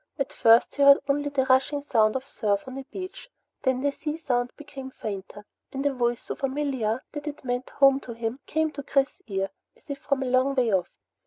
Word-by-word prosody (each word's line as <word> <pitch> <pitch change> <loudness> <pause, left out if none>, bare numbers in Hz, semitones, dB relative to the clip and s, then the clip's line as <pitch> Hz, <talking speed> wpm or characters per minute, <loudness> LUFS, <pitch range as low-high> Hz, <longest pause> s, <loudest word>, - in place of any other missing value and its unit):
At 275 -2 -2
first 230 +1 +5
he 285 - -3
heard 280 0 +9
only 290 +1 +1
the 275 -2 +1
rushing 265 +2 +2
sound 220 -5 +3
of 265 0 -2
surf 205 -6 -1
on 260 +1 -6
a - - -6
beach. 375 - -8 0.3
Then 260 -1 +1
the 285 +1 +2
sea 300 +2 -4
sound 245 -6 0
became 280 -3 -8
fainter 205 -3 -7 0.3
and 270 +1 -4
a 285 - +2
voice 240 -1 0
so - - -4
familiar 265 -4 -1
that 295 0 -6
it 290 -2 -6
meant 245 0 -2
home 275 -1 +5
to 245 - -8
him 230 +2 -3
came 315 0 +1
to 285 - -6
Chris's 275 +6 0
ear 195 -2 -2 0.3
as - - -29
if 280 -1 -5
from 275 -1 0
a - - -3
long 255 +2 +2
way 240 -5 +2
off. 185 -2 +1
265 Hz, 220 wpm, -26 LUFS, 240-285 Hz, 0.3 s, heard